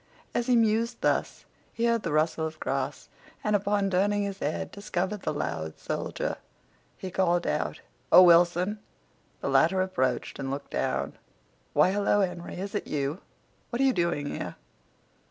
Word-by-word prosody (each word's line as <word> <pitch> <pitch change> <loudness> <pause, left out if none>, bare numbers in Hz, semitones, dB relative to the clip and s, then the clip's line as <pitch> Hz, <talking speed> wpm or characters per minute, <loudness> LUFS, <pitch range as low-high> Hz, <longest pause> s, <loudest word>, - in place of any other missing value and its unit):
As 240 +1 0
he 250 - +4
mused 230 +1 +2
thus - - 0 0.3
he 230 - -1
heard 235 -1 +2
the 170 - -3
rustle 160 +1 +1
of 155 0 -10
grass, 135 +1 -3 0.4
and, 210 0 +2
upon 200 0 +1
turning 205 +2 +2
his 200 -1 -4
head, 150 - -2
discovered 200 0 -3
the - - -1
loud 80 - -3
soldier. - - -3 0.6
He 185 - -6
called 175 -2 +2
out, - - -1 0.3
"Oh, 185 - +10
Wilson!" 175 +4 +4 0.6
The - - -1
latter 190 - +4
approached 130 -10 -1
and 135 - -3
looked 140 +1 -5
down. - - -2 0.5
"Why, 150 +5 +5
hello, 205 +1 +2
Henry; 175 -2 -3
is 195 +2 -5
it - - -3
you? 145 +4 -2 0.5
What 240 - -3
are 270 - +4
you 265 - +4
doing 170 -5 0
here?" - - -5
185 Hz, 160 wpm, -28 LUFS, 155-205 Hz, 0.6 s, Oh